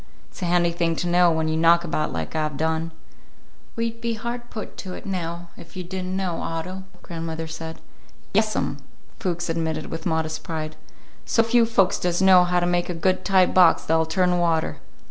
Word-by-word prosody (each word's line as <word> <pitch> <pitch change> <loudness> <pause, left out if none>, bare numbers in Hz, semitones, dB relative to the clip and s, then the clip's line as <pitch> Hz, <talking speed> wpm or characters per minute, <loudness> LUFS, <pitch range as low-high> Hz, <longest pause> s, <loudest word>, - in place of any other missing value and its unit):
It's - - -13
a - - 0
handy 175 0 +3
thing 170 -1 0
to 175 - -2
know, 175 0 +5
when 160 0 0
you 155 - 0
knock 170 +1 +5
about 155 -2 -1
like 80 - -4
I've 155 -2 -1
done." 160 +1 0 0.9
"We'd 230 0 -3
be 235 -1 -1
hard 240 +2 -5
put 215 - -7
to 185 -2 -6
it - - -10
now, 175 -2 -4
if 170 - -12
you 185 - -3
did 185 +1 -5
n't 185 +1 -3
know, 185 -3 -2
Otto," 185 +4 -4 0.2
grandmother 165 -1 -5
said. 160 0 -7 0.5
"Yes, 215 +1 +2
'm," 140 - -1 0.4
Fuchs 175 -1 -2
admitted 160 -2 -2
with 165 +2 -4
modest 160 -1 -1
pride. 155 -2 -5 0.5
"So 225 - +2
few 230 0 +3
folks 200 -4 +2
does 175 -1 0
know 190 -1 +7
how 180 0 +2
to 175 - 0
make 175 0 0
a 175 - -2
good 185 +2 +1
tight 190 -2 +3
box 180 -3 +6
that'll 160 0 +2
turn 180 +2 +2
water. 165 -2 +1
175 Hz, 200 wpm, -24 LUFS, 160-185 Hz, 0.9 s, know